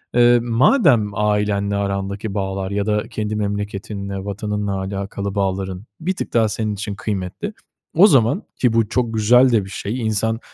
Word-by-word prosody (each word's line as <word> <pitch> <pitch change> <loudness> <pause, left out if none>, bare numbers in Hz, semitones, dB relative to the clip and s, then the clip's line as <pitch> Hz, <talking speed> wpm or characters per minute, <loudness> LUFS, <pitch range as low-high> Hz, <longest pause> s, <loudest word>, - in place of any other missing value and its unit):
eee, 120 0 +6
madem 120 - +4
ailenle 105 -1 0
arandaki 100 +1 -2
bağlar 95 -1 -3
ya 100 0 -1
da 105 0 +1
kendi 110 0 -3
memleketinle, 100 -1 -4
vatanınla 105 -1 -2
alakalı 100 +1 -4
bağların 95 0 -2 0.2
bir 185 +4 -1
tık - - -5
daha 115 -2 +3
senin 110 0 -2
için 100 0 -5
kıymetli. 100 - -4 0.4
O 185 +6 +8
zaman, 135 - +3
ki 125 -3 +1
bu 115 -2 +2
çok 120 -1 0
güzel 125 +4 +5
de 110 -5 +2
bir - - -10
şey 105 +5 -4
insan 110 0 0
105 Hz, 160 wpm, -20 LUFS, 100-115 Hz, 0.4 s, O